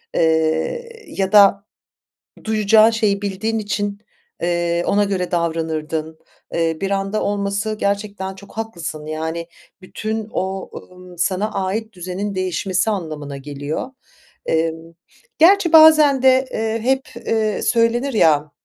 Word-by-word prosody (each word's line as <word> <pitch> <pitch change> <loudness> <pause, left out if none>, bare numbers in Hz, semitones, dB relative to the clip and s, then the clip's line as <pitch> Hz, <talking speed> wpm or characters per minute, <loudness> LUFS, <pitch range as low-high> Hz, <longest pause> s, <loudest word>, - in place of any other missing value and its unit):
eee, 160 - 0
ya 190 -1 -2
da 200 -1 +6 0.8
duyacağın 220 0 +4
şeyi 210 -3 0
bildiğin 205 +3 -2
için, 205 -1 -3 0.4
eee, 175 0 0
ona 205 0 +3
göre 185 -3 -2
davranırdın. 160 -2 -2 0.4
Eee, 165 -1 0
bir 195 - -2
anda 195 +2 -1
olması 205 +1 -1
gerçekten 200 -1 -2
çok 200 +1 -14
haklısın, 170 -9 -6
yani, 160 +2 -4 0.4
bütün 215 +3 -4
o, 190 0 -3 0.2
ımm, 180 -1 -14
sana 200 +4 0
ait 215 +4 -2
düzenin 185 +3 -5
değişmesi 185 +2 -1
anlamına 155 -8 -5
geliyor. 145 - -5 0.6
Emm, 165 +1 -2 0.4
gerçi 350 +1 +5
bazen 310 -4 +7
de, 260 0 +4
eee, 225 0 -1
hep, 265 +3 -1
eee, 215 -2 0
söylenir, 240 +3 +1
ya 150 -7 +3
195 Hz, 120 wpm, -20 LUFS, 170-220 Hz, 0.8 s, bazen